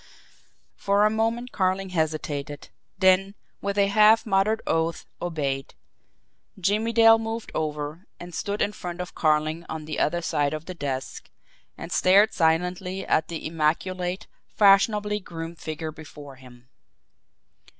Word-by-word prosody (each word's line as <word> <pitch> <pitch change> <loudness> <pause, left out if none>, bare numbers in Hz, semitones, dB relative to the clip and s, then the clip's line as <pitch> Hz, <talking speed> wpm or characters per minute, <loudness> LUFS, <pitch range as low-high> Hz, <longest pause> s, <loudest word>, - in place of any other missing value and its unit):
For 200 +1 +2
a 215 - +3
moment 230 +3 -1
Carling 190 0 0
hesitated; 155 -4 -3 0.3
then, 190 +1 +3 0.3
with 200 0 -3
a 200 - +5
half 215 +2 +5
muttered 210 +1 +2
oath, 165 0 -1 0.2
obeyed. 140 -6 -3 0.8
Jimmie 210 +5 +1
Dale 225 0 +6
moved 225 0 -5
over, 150 +3 -4
and 175 0 -10
stood 205 +4 -2
in 205 - -1
front 180 -4 -7
of 180 -1 -6
Carling 155 +1 +1
on 160 -1 -5
the 155 - -4
other 175 +2 0
side 150 -3 0
of 155 +1 -8
the 185 - -6
desk 135 -6 -5 0.5
and - - -8
stared 200 +4 +4
silently 180 +3 0
at 155 - +1
the 165 -2 -6
immaculate, 175 +4 -1 0.2
fashionably 210 +1 +3
groomed 165 -3 -8
figure 155 0 -5
before 145 -3 -12
him. 125 -1 -16
175 Hz, 135 wpm, -25 LUFS, 155-200 Hz, 0.8 s, Dale